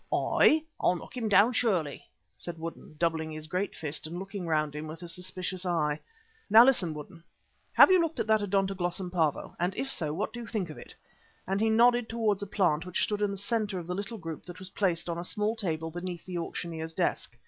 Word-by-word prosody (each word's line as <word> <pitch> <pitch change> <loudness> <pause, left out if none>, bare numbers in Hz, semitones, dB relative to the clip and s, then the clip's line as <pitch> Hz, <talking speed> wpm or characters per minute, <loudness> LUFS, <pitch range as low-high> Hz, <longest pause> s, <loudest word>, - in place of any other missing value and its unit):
"Aye, 310 +1 +4 0.2
I'll 180 - +3
knock 175 - -9
him 230 -3 -1
down 205 +5 +6
surely," 185 - 0 0.3
said 175 -1 -6
Woodden, 165 -1 -8
doubling 160 -1 0
his 155 0 -6
great 185 +5 -2
fist 155 0 -2
and 170 +2 -6
looking 195 -1 -5
round 155 -2 +1
him 150 +1 -5
with 165 +3 -8
a - - -6
suspicious 185 +1 -2
eye. 155 -4 0 0.5
"Now 225 +3 +9
listen, 185 -12 +3
Woodden. 165 +3 -9 0.5
Have - - +8
you 370 -2 +6
looked 330 -1 -2
at - - +1
that 220 -1 +3
Odontoglossum 190 -2 -1
Pavo, 160 -5 0
and 180 +2 0
if 270 0 -1
so, 155 -3 -1
what 180 +8 -3
do 240 - -6
you 235 - -7
think 195 -9 -2
of - - -10
it?" - - -12 0.5
and 195 +2 -1
he 220 - +3
nodded 240 +1 +4
towards 220 -3 0
a 205 - -4
plant 175 -6 +1
which 180 0 -1
stood 210 -1 -1
in 205 - +2
the 200 - -4
centre 205 -1 0
of 175 - -5
the 180 - -3
little 200 +4 -4
group 165 -5 -7
that 175 0 -8
was 185 0 -8
placed 180 -5 0
on 170 -1 -2
the 170 - -4
small 210 +4 0
table 165 -6 -2
beneath 175 0 -6
the 180 -2 -4
auctioneer's 165 -1 -5
desk. - - -1
180 Hz, 225 wpm, -29 LUFS, 165-210 Hz, 0.5 s, Now